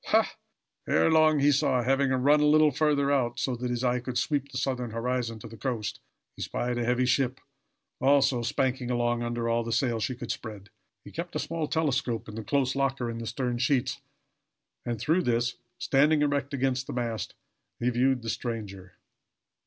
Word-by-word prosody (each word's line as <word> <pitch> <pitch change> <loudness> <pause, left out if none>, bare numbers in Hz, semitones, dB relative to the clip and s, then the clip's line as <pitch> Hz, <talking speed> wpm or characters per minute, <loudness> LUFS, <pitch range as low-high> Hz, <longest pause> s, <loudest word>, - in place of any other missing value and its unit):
Ha! - - +2 0.5
Ere 80 +1 +3
long 155 -1 +5
he 145 +1 +5
saw. 130 -2 +2
Having 135 +2 +2
run 135 +3 +4
a 150 - +3
little 155 0 +5
further 145 0 +2
out, 120 -4 +1
so 130 - -1
that 125 +1 -4
his 120 0 -2
eye 125 0 +2
could 125 0 -4
sweep 140 -2 0
the 130 - -5
southern 125 -2 -1
horizon 115 0 -2
to 110 - -10
the 115 - -11
coast, 120 -5 -3 0.4
he - - -10
espied 120 0 -2
a - - 0
heavy 125 +2 +1
ship, 130 0 +1 0.6
also 135 -2 +3
spanking 125 +1 -1
along 120 -1 0
under 120 0 -2
all 115 0 +1
the 115 - -5
sail 120 -1 +1
she 125 +3 -2
could 120 -1 -5
spread. 105 -3 -7 0.3
He - - -10
kept - - -6
a - - +2
small 165 -2 -2
telescope 135 -8 -1
in 105 - -8
the 110 +1 -5
close 135 +1 0
locker 135 -3 0
in 115 - -6
the 115 - -5
stern 120 +1 -2
sheets, 130 0 0 0.9
and, 120 -2 -2
through 160 +8 +2
this, 120 -4 0 0.2
standing 150 +2 +3
erect 140 -1 0
against 130 -1 -1
the - - -5
mast, 115 -3 -3 0.4
he 120 +1 +1
viewed 125 0 +1
the 115 - -4
stranger. 100 -6 -6
125 Hz, 190 wpm, -28 LUFS, 120-140 Hz, 0.9 s, long